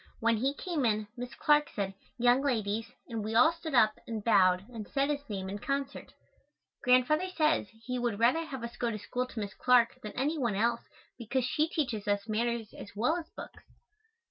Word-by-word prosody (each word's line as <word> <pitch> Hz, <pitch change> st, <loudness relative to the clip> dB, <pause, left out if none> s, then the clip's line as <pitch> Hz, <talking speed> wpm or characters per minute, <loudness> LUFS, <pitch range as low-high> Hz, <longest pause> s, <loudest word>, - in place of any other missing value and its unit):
When 230 Hz, 0 st, +2 dB
he 270 Hz, +5 st, 0 dB
came 330 Hz, -3 st, -2 dB
in, 215 Hz, -2 st, +1 dB
Miss 245 Hz, 0 st, -7 dB
Clark 295 Hz, 0 st, +3 dB
said, 195 Hz, -1 st, -2 dB, 0.2 s
"Young 245 Hz, +2 st, +4 dB
ladies," 225 Hz, -5 st, -1 dB, 0.2 s
and 225 Hz, -3 st, -4 dB
we 220 Hz, +1 st, -3 dB
all 315 Hz, +8 st, +7 dB
stood 330 Hz, -4 st, -5 dB
up 215 Hz, -3 st, +4 dB
and 220 Hz, -3 st, -4 dB
bowed 185 Hz, -4 st, +4 dB
and 220 Hz, -3 st, -6 dB
said 275 Hz, +1 st, 0 dB
his 285 Hz, -2 st, -4 dB
name 190 Hz, -2 st, -4 dB
in 200 Hz, +2 st, -5 dB
concert. 275 Hz, +3 st, -3 dB, 0.7 s
Grandfather 255 Hz, +8 st, +3 dB
says 310 Hz, -, +1 dB, 0.2 s
he 250 Hz, 0 st, -2 dB
would 240 Hz, -4 st, -1 dB
rather 250 Hz, +9 st, +3 dB
have 270 Hz, -6 st, -7 dB
us 235 Hz, 0 st, -7 dB
go 240 Hz, -, 0 dB
to 215 Hz, -, -3 dB
school 250 Hz, +4 st, -3 dB
to 240 Hz, -, -7 dB
Miss 200 Hz, -2 st, -4 dB
Clark 245 Hz, 0 st, +3 dB
than 210 Hz, -, -7 dB
any 295 Hz, +5 st, -1 dB
one 240 Hz, -6 st, 0 dB
else 235 Hz, +3 st, +1 dB, 0.4 s
because 245 Hz, +2 st, -1 dB
she 305 Hz, +5 st, +1 dB
teaches 245 Hz, -11 st, -2 dB
us 205 Hz, +1 st, 0 dB
manners 230 Hz, 0 st, -1 dB
as 205 Hz, -, -11 dB
well 245 Hz, +10 st, +2 dB
as 335 Hz, -2 st, -6 dB
books. -, -, -9 dB
240 Hz, 200 wpm, -30 LUFS, 215-275 Hz, 0.7 s, all